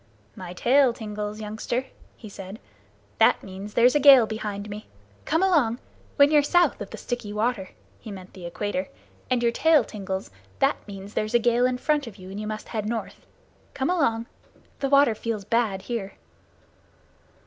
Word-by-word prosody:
"My 180 -1 -8
tail 255 +6 +4
tingles, 210 -2 -5
youngster," 220 +4 -3 0.3
he 220 - -11
said. 195 0 -9 0.6
"That - - +4
means 195 +2 -9
there's 245 +2 +5
a 295 - +3
gale 270 -4 +8
behind 210 -2 -5
me. 210 +1 -8 0.4
Come 320 +4 +1
along! 290 -12 +3 0.4
When 285 0 +5
you're 300 -1 +6
south 350 +5 +2
of - - -5
the - - -8
Sticky 245 -4 -5
Water 210 -2 -1 0.3
[he 220 - -9
meant 190 -2 -10
the 180 -2 -8
Equator] 210 +10 -3 0.4
and 250 -2 +1
your 235 - +3
tail 310 +2 +4
tingles, 190 - -5 0.3
that - - +2
means 200 0 -9
there's 215 +2 -1
a - - +9
gale 240 +1 +3
in 255 0 -1
front 295 0 0
of 220 - -9
you 190 -1 -11
and 200 - -6
you 215 - -4
must 215 0 -6
head 215 -2 -3
north. 230 -1 -5 0.5
Come 280 +4 0
along! 230 -10 +1 0.5
The 275 - -1
water 280 -4 +5
feels 215 -2 -4
bad 210 -3 0
here." 215 -4 -4
225 Hz, 175 wpm, -25 LUFS, 205-255 Hz, 0.6 s, a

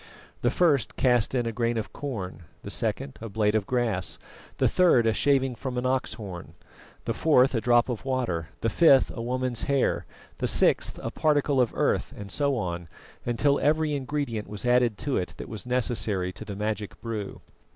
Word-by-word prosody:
The 120 - +3
first 145 -4 +2
cast 125 -1 +2
in 120 -2 +1
a 115 - -1
grain 115 +1 0
of 110 - -4
corn; 95 - -5 0.2
the - - -4
second, 70 -1 -2
a 115 - -6
blade 105 0 +1
of 110 -3 0
grass; 115 -7 -1 0.4
the - - +3
third, 170 -11 +4
a 110 - +3
shaving 135 -1 +2
from 125 +1 -5
an 125 - -1
ox's 130 0 0
horn; 95 -6 -8 0.5
the - - 0
fourth, 135 -4 +4
a 115 - 0
drop 120 +1 +4
of 120 -4 -4
water; 120 - -2
the 115 - +1
fifth, 135 +2 +5
a 115 - -4
woman's 125 0 -1
hair; 140 -2 +1 0.3
the - - 0
sixth, - - +2
a - - -3
particle 145 -3 +2
of 120 - +1
earth; - - 0
and 100 -1 -8
so 140 -2 +1
on, 85 -5 -3 0.4
until 140 +4 +2
every 155 0 +2
ingredient 135 -5 -3
was 105 +2 -6
added 120 -3 +3
to 140 +6 -1
it 90 - -3
that - - -7
was 110 +1 -7
necessary 110 -7 0
to 110 - -9
the 100 -2 -6
magic 105 0 -3
brew. 110 -4 -5
120 Hz, 190 wpm, -27 LUFS, 105-135 Hz, 0.5 s, fifth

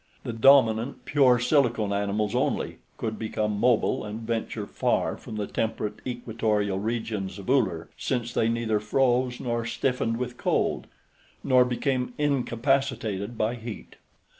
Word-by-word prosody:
The 120 - -4
dominant 120 0 +4
pure 135 -4 +4
silicone 120 -5 +2
animals 100 +1 -1
only - - -1 0.2
could 110 -1 -3
become 105 -1 -2
mobile 120 -1 +2
and 105 +1 -6
venture 115 -2 -3
far - - 0
from - - -9
the 105 -1 -2
temperate 110 -1 -3
equatorial 110 -5 -1
regions 105 -3 -3
of 100 +5 -3
Uller, 95 -12 +1
since 120 -2 -2
they 115 - +2
neither 115 -2 0
froze 125 +3 +1
nor 120 -1 -2
stiffened 115 -1 -1
with 125 0 -4
cold, - - 0 0.6
nor 130 -1 +5
became 125 0 -1
incapacitated 125 -6 0
by 110 +2 +1
heat. 115 -3 -8
115 Hz, 135 wpm, -26 LUFS, 105-125 Hz, 0.6 s, nor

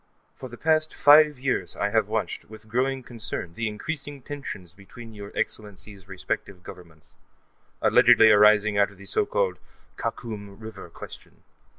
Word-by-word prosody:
For 130 - -10
the 120 - -10
past 155 +1 +1
five 150 +1 +6
years, 130 0 -2
I - - -1
have - - +2
watched, - - -3
with 110 0 -14
growing 130 +3 -1
concern, 110 -8 -6
the 115 +5 -3
increasing 140 +5 -6
tensions 105 - -8
between 110 +4 -13
your 100 -1 -9
Excellencies' 100 -2 -5
respective 95 -1 -5
Governments, 85 -4 -14 0.7
allegedly 110 -1 +6
arising 105 0 +5
out 100 0 +4
of 100 - -18
the 100 - -13
so 95 - +1
called 95 -3 -1 0.4
Khakum 105 -4 -6
River 110 -5 -10
question. - - -12
105 Hz, 150 wpm, -25 LUFS, 100-125 Hz, 0.7 s, five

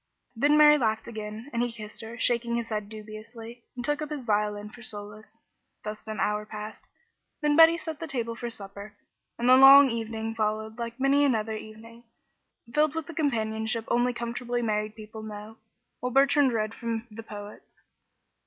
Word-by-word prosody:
Then 290 +6 +4
Mary 300 0 +7
laughed 220 -2 0
again, 220 +3 -7
and 235 - 0
he 245 0 0
kissed 215 -2 -9
her, 225 +1 -8
shaking 235 -1 +1
his 235 -1 -3
head 210 -2 -3
dubiously, 225 +2 -10
and 245 -1 -4
took 295 +2 0
up 305 - -4
his 290 -5 -5
violin 210 -1 -1
for 235 - -13
solace. 210 -1 -7 0.5
Thus 215 +1 -7
an 215 0 -5
hour 210 0 0
passed; 215 0 -8 0.5
then 295 -1 +2
Betty 330 +1 +8
set 320 -3 -6
the 330 - -5
table 235 -5 -2
for 240 +1 -5
supper, 200 -1 -9 0.4
and 240 - -1
the 255 - +8
long 270 0 +9
evening 225 -1 -3
followed 220 +1 -2
like 235 +1 -5
many 275 +2 +4
another 220 -5 +1
evening, 225 +2 -11 0.7
filled 305 0 +2
with 325 -2 -3
the 335 - -9
companionship 220 -6 -1
only 245 +1 +2
comfortably 240 0 -3
married 215 -1 -1
people 220 0 -9
know, 215 +1 -9 0.4
while 250 - -3
Bertrand 275 +1 +4
read 215 -1 -1
from 230 -1 -4
the 220 +2 -8
poets. 205 -1 -11
230 Hz, 175 wpm, -27 LUFS, 215-250 Hz, 0.7 s, long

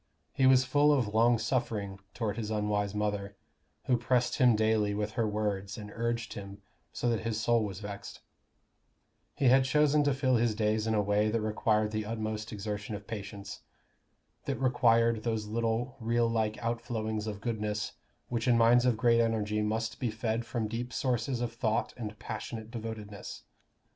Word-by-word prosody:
He 130 - +3
was 130 0 +6
full 145 +3 +4
of 120 -8 +1
long 115 +2 +4
suffering 110 -4 -2 0.2
toward 110 -4 -2
his 110 -2 -4
unwise 105 -1 -1
mother, 105 -1 -2 0.5
who 125 - +2
"pressed 120 +1 +1
him 125 -3 +6
daily 110 -1 +2
with 105 +1 -2
her 115 -1 0
words 105 -2 -2
and 105 -1 -8
urged 115 -1 -2
him, 100 0 -9 0.3
so - - -2
that 115 -2 +2
his 110 -1 -2
soul 115 0 +2
was 100 -1 -5
vexed;" 100 -1 -7 1.2
he 140 - -1
had 130 +1 +6
chosen 150 +2 +3
to 140 -2 +2
fill 130 -2 +2
his 115 -2 +1
days 110 0 +1
in 110 - +1
a 105 - +2
way 105 +1 +2
that 115 +1 0
required 105 0 +1
the 110 -1 -2
utmost 110 -1 -3
exertion 105 0 -4
of 105 0 -8
patience, 100 -2 -7 0.8
that - - -1
required 115 -3 +3
those 110 -2 -1
little 115 +3 -1
rill 115 0 +1
like 110 -2 0
outflowings 110 -2 -2
of 105 -2 -4
goodness 105 -2 -2 0.4
which 120 0 -2
in 120 -1 +5
minds 120 +2 +5
of 120 -3 +2
great 115 0 +4
energy 105 -2 0
must 110 +2 -2
be 125 - 0
fed 110 +1 -2
from 115 -3 -2
deep 120 +3 -4
sources 125 0 -1
of 120 -1 -2
thought 115 -2 -1
and 110 -2 -6
passionate 110 +1 -6
devotedness. 110 -3 -7
110 Hz, 175 wpm, -30 LUFS, 105-120 Hz, 1.2 s, was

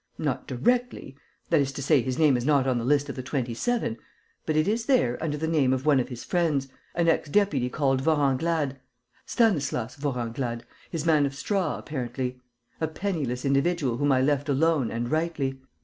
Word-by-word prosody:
Not 135 -4 -2
directly: 240 - -1 0.4
that 160 -3 +5
is 135 -1 -1
to 140 - -5
say, 145 -1 +4
his 130 +1 -3
name 150 -4 +4
is 120 - -1
not 140 -1 +3
on 130 -2 +1
the - - -3
list 145 +3 +2
of - - -5
the 130 - -4
Twenty 130 -2 -2
seven; 225 - -1 0.5
but 155 - 0
it 155 +2 +2
is 225 +2 0
there 250 - +3
under 150 -2 -1
the 160 +2 -2
name 145 -5 +2
of 130 +1 -2
one 145 -3 +5
of 125 - -2
his 125 -2 -7
friends, 155 -6 0 0.3
an 170 -1 +1
ex 160 -2 +2
deputy 145 -9 +2
called 135 -1 +1
Vorenglade, 145 0 +1 0.5
Stanislas 145 - +1
Vorenglade, 120 -3 -3 0.3
his 165 -2 -4
man 155 -3 +4
of 135 - -7
straw, 180 +2 -1
apparently: 125 -2 -4 0.4
a 160 - +1
penniless 155 -8 -3
individual 140 -2 +1
whom 145 +1 +2
I 130 -1 +3
left 145 +1 +1
alone 145 -2 +2
and 120 +1 -3
rightly. 155 -5 -1
140 Hz, 190 wpm, -26 LUFS, 130-160 Hz, 0.5 s, that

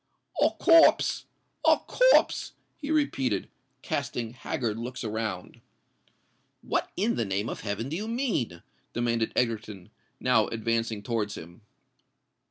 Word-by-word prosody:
"A - - +6
corpse! 330 -2 +5 0.4
a - - +6
corpse!" - - +3 0.3
he 290 - -6
repeated, 135 - +1 0.4
casting 115 -1 -3
haggard 115 -3 -3
looks 125 +2 -5
around. 110 -4 -4 1.0
"What - - -1
in 215 +5 +1
the 115 - +1
name 100 +2 -2
of - - -5
heaven 105 +3 -3
do 150 - -4
you 210 +5 -3
mean?" 225 - -2 0.3
demanded 115 -1 0
Egerton, 110 -5 -2 0.3
now 125 -4 +3
advancing 115 -1 -1
towards 110 -3 -2
him. 85 +7 -11
115 Hz, 120 wpm, -28 LUFS, 105-130 Hz, 1.0 s, A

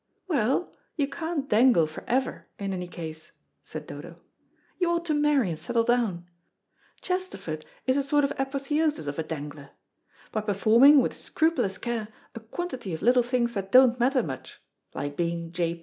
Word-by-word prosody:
"Well, 275 - +1 0.2
you 285 -3 +1
can't 320 -2 -3
dangle 225 - +5
for 155 0 -9
ever 260 +1 -1
in 195 -1 -3
any 180 -1 -4
case," 160 -2 -8 0.3
said - - -8
Dodo. - - -9 0.6
"You 355 -2 +2
ought 340 0 0
to 315 - 0
marry 295 -7 +3
and 160 -2 -4
settle 230 +7 0
down. 230 -8 +1 0.8
Chesterford 195 - -4 0.2
is 260 +1 +2
a - - +3
sort 290 +1 +2
of 280 - +1
apotheosis 275 - 0
of 145 +2 -4
a - - 0
dangler. 145 -2 -7 0.6
By 215 - -1
performing, 225 +7 +6
with - - -1
scrupulous 255 - 0
care, 230 -1 -3 0.3
a - - -7
quantity 235 - -5
of 160 - -8
little 245 +1 +5
things 240 -1 0
that 195 -2 -4
don't 255 0 +6
matter 255 +1 +3
much, 135 -4 -7 0.4
like 145 0 -4
being 170 0 -2
J. 170 -1 -1
235 Hz, 165 wpm, -27 LUFS, 175-275 Hz, 0.8 s, performing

